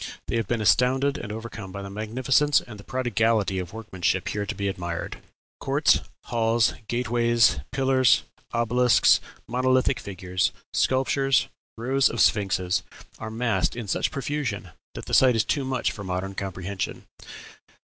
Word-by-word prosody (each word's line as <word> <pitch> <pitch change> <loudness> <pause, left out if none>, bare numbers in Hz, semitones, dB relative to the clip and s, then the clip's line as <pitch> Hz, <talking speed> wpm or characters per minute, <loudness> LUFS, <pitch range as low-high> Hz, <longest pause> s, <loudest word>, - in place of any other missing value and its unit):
They - - -3
have 115 -3 -1
been 120 0 -1
astounded 130 +6 +3
and 105 - -6
overcome 110 -3 -7
by 100 +1 -6
the 100 - -7
magnificence 130 +7 +2
and 105 -3 -11
the - - -11
prodigality 115 -6 0
of 90 - -6
workmanship 95 -4 -2
here 105 -1 -3
to - - -3
be 100 -1 -2
admired. 85 -3 -4 0.4
Courts, - - +3 0.2
halls, 115 -1 +1
gate 120 +1 -2
ways, 120 -7 +3
pillars, 130 -1 +3 0.3
obelisks, 120 +1 +4 0.3
monolithic 130 -1 +2
figures, 90 -2 -2 0.2
sculptures, 135 0 +2 0.3
rows 130 +4 +2
of 120 - -5
sphinxes, 95 -4 +2 0.4
are 110 - -5
massed 115 +1 0
in 120 -3 -6
such - - 0
profusion 135 - -3 0.2
that - - -7
the - - -7
sight 130 -2 +6
is 110 - +3
too 140 - 0
much 130 -1 -1
for 100 - -8
modern 95 +1 -3
comprehension." 95 0 -5
115 Hz, 150 wpm, -25 LUFS, 100-125 Hz, 0.4 s, sight